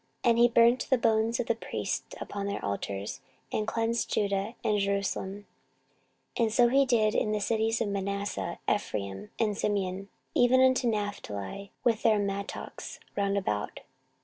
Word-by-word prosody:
14:034:005 240 - +4
And 230 - +2
he 240 - +8
burnt 235 +1 +4
the 260 - +5
bones 225 0 +2
of 245 - 0
the 230 - +2
priests 225 - -4
upon 200 -1 -4
their 200 - -3
altars, 100 +4 -3 0.3
and 215 - 0
cleansed 230 0 0
Judah 200 +2 0
and 210 -1 +2
Jerusalem. 200 0 -2 0.9
14:034:006 - - +1
And 220 -1 +1
so 240 0 +5
did 245 -6 +4
he - - +3
in 215 - -1
the 210 - 0
cities 225 +2 +1
of 225 - +1
Manasseh, 200 -3 -2
and - - +4
Ephraim, 100 - -5
and 215 -3 +1
Simeon, 195 -2 -1 0.2
even 245 +1 +5
unto 260 -1 +4
Naphtali, 200 - -3
with 230 -2 +2
their 220 -2 +4
mattocks 200 0 -4 0.2
round 200 0 +1
about. 105 - -2
210 Hz, 165 wpm, -29 LUFS, 195-230 Hz, 0.9 s, he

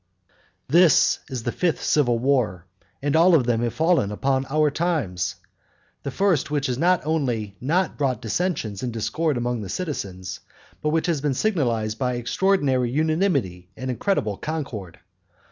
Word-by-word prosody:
III. 90 0 -41 0.3
This 170 0 +5
is 130 -4 -4
the 120 - -1
fifth 175 +3 -1
civil 125 -6 +2
war, 115 -9 0 0.4
(and 145 +1 +1
all 170 +2 +6
of 135 -6 +3
them 115 -1 +1
have 120 -1 -2
fallen 160 - +2
upon 135 +5 0
our 150 +1 +2
times,) 105 - -1 0.7
the - - -4
first 165 -2 +1
which 145 -2 -1
has 125 -1 -1
not 180 -1 +2
only 120 -10 -1
not 165 +7 0
brought 135 -3 0
dissensions 110 - -2
and 125 - -2
discord 145 +6 -1
among 120 -1 -1
the 100 - -6
citizens, 95 - -4 0.4
but 150 - 0
which 160 +1 +1
has 165 -5 0
been 145 -2 0
signalised 120 - 0
by 125 -1 0
extraordinary 130 -1 +1
unanimity 145 - 0
and 130 0 -3
incredible 115 - -1
concord. 125 - -5
135 Hz, 160 wpm, -23 LUFS, 115-160 Hz, 0.7 s, all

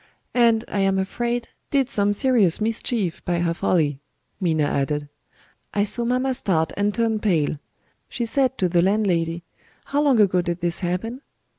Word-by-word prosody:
"And, 230 -2 +3
I 205 - -3
am 195 0 +2
afraid, 235 +5 -2 0.2
did 275 -3 +2
some 205 -4 +2
serious 215 - +2
mischief 220 -4 -2
by 175 -1 -1
her 170 -1 0
folly," 150 -5 0 0.4
Minna 160 -5 +1
added. 145 +1 -1 0.7
"I 205 - +3
saw 235 +3 -1
mamma 255 +2 +1
start 165 -9 0
and 205 +1 +1
turn 225 0 0
pale. 160 -8 0 0.5
She 240 - -3
said 260 +2 +1
to 185 - +1
the 175 0 +2
landlady, 175 -4 +1 0.4
'How 285 +1 0
long 275 -6 +3
ago 185 -3 +4
did 175 0 -3
this 175 -1 0
happen?' 200 +8 -3
200 Hz, 160 wpm, -23 LUFS, 170-235 Hz, 0.7 s, ago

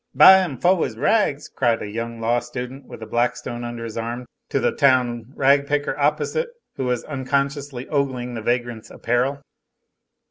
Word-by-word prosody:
"Buy 190 0 +9
'im 150 -8 -4
foh 180 +5 +3
'is 110 - -4
rags!" 150 - +1
cried 120 -3 0
a - - -5
young 115 +2 -5
law 115 +2 +1
student, 125 +2 -7
with 110 - -9
a - - -6
Blackstone 120 +1 -2
under 120 -1 -5
his 115 0 -5
arm, 120 +2 -4 0.2
to 140 - +1
the - - +2
town 125 -4 +2
rag 140 +1 +3
picker 145 0 0
opposite, 150 - 0 0.3
who 130 - -3
was 125 -1 -1
unconsciously 140 -1 -2
ogling 130 -4 -1
the 115 - -5
vagrant's 120 -1 -2
apparel. 130 +4 -1
125 Hz, 170 wpm, -22 LUFS, 120-140 Hz, 0.3 s, Buy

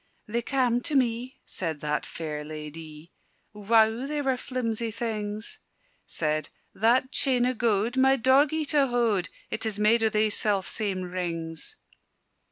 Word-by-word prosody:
"They 235 +3 -1
cam' 245 -1 +1
to 295 - -3
me," 250 0 0
said 160 -5 -3
that 150 0 -1
fair 155 -2 -5
ladye. 155 +1 -9 0.4
"Wow, 220 +4 +3
they 295 0 -2
were 265 -1 +2
flimsie 235 -3 -2
things!" 215 -1 -4 0.5
Said 155 -1 -1 0.2
"that 240 +5 +2
chain 255 -4 +2
o' 255 - +1
gowd, 230 0 +1
my 265 +1 +5
doggie 275 +5 +3
to 285 -2 +4
howd, 230 -7 +1 0.2
It 220 - -3
is 220 -2 0
made 220 +2 +4
o' 220 - +4
thae 215 0 +2
self 205 -2 +1
same 195 -4 -1
rings." 170 -3 -5
220 Hz, 145 wpm, -27 LUFS, 185-250 Hz, 0.5 s, my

